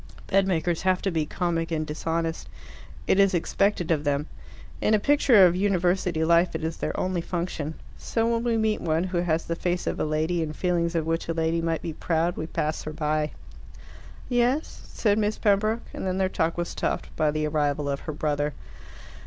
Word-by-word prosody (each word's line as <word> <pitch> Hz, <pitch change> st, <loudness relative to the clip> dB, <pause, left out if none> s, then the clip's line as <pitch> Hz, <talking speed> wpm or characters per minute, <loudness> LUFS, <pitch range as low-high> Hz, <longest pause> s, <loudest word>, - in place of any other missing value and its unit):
Bedmakers 180 Hz, -4 st, +1 dB
have 185 Hz, -1 st, +2 dB
to 195 Hz, -, 0 dB
be 160 Hz, -3 st, -1 dB
comic 165 Hz, -2 st, -1 dB
and 155 Hz, -2 st, -1 dB
dishonest. 165 Hz, +2 st, -3 dB, 0.6 s
It 190 Hz, -, +3 dB
is 195 Hz, -1 st, +4 dB
expected 175 Hz, 0 st, +1 dB
of 150 Hz, -3 st, +1 dB
them. 145 Hz, 0 st, 0 dB, 0.6 s
In 215 Hz, -, +4 dB
a -, -, +2 dB
picture 255 Hz, -5 st, +5 dB
of 175 Hz, -1 st, +3 dB
university 180 Hz, -3 st, +1 dB
life 170 Hz, +2 st, +3 dB
it -, -, -3 dB
is 160 Hz, +1 st, -2 dB
their -, -, -3 dB
only 185 Hz, -2 st, -1 dB
function. 170 Hz, -3 st, -3 dB, 0.2 s
So 225 Hz, -1 st, -1 dB
when 230 Hz, 0 st, +1 dB
we 235 Hz, -2 st, +1 dB
meet 220 Hz, -1 st, +1 dB
one 165 Hz, 0 st, +1 dB
who 185 Hz, -1 st, -1 dB
has 165 Hz, -2 st, 0 dB
the 170 Hz, -, -2 dB
face 175 Hz, +1 st, -1 dB
of -, -, -2 dB
a -, -, +1 dB
lady, 155 Hz, +3 st, 0 dB
and 155 Hz, -1 st, -3 dB
feelings 175 Hz, -2 st, 0 dB
of 165 Hz, -2 st, 0 dB
which 165 Hz, +1 st, -1 dB
a 165 Hz, -, -1 dB
lady 165 Hz, 0 st, +1 dB
might 165 Hz, -1 st, -1 dB
be 165 Hz, -, -3 dB
proud, 165 Hz, +2 st, 0 dB
we 155 Hz, -, -4 dB
pass 155 Hz, -1 st, -2 dB
her 155 Hz, -, -6 dB
by. 150 Hz, -1 st, -1 dB, 0.9 s
"Yes?" 250 Hz, +5 st, 0 dB
said 210 Hz, -1 st, +1 dB
Miss 210 Hz, 0 st, 0 dB
Pembroke, 215 Hz, +2 st, +2 dB
and -, -, -4 dB
then 185 Hz, 0 st, -1 dB
their 190 Hz, -1 st, +1 dB
talk 165 Hz, -2 st, -1 dB
was 175 Hz, 0 st, -2 dB
stopped -, -, -3 dB
by 155 Hz, -, +2 dB
the 155 Hz, +1 st, -1 dB
arrival 150 Hz, -1 st, 0 dB
of 140 Hz, -1 st, -1 dB
her 155 Hz, -, -6 dB
brother. 145 Hz, -1 st, -1 dB
170 Hz, 200 wpm, -26 LUFS, 155-190 Hz, 0.9 s, picture